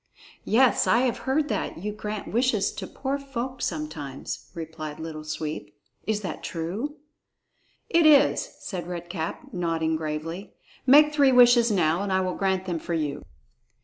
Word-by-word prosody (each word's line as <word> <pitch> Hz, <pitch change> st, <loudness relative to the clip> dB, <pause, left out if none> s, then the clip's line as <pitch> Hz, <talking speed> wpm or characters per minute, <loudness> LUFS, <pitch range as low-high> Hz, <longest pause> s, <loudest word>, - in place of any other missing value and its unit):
"Yes, 250 Hz, +3 st, +4 dB
I 235 Hz, -, +4 dB
have 255 Hz, -2 st, 0 dB
heard 290 Hz, +2 st, +2 dB
that 210 Hz, -, -2 dB
you 205 Hz, +5 st, -4 dB
grant 210 Hz, -1 st, -6 dB
wishes 235 Hz, -3 st, +2 dB
to -, -, -6 dB
poor 275 Hz, +1 st, -3 dB
folk 260 Hz, -2 st, -5 dB
sometimes," 150 Hz, -4 st, -5 dB
replied 160 Hz, -2 st, -6 dB
Little 160 Hz, -1 st, -6 dB
Sweep; 155 Hz, -8 st, -5 dB, 0.3 s
"is 215 Hz, -1 st, 0 dB
that 180 Hz, -6 st, -5 dB
true?" 195 Hz, -, -4 dB, 0.9 s
"It 335 Hz, -2 st, +4 dB
is," 295 Hz, -, +5 dB
said 175 Hz, -4 st, -5 dB
Red 175 Hz, -1 st, -6 dB
Cap, 165 Hz, -3 st, -5 dB
nodding 165 Hz, -3 st, 0 dB
gravely. 160 Hz, +4 st, -5 dB, 0.3 s
"Make 300 Hz, +3 st, +7 dB
three 280 Hz, -3 st, +5 dB
wishes 245 Hz, -1 st, +6 dB
now, 175 Hz, -4 st, +2 dB
and 200 Hz, -1 st, -2 dB
I 190 Hz, -, +3 dB
will 185 Hz, -1 st, -1 dB
grant 190 Hz, -1 st, 0 dB
them 175 Hz, -3 st, -2 dB
for 170 Hz, +1 st, -3 dB
you." 150 Hz, -3 st, -2 dB
190 Hz, 155 wpm, -26 LUFS, 160-245 Hz, 0.9 s, Make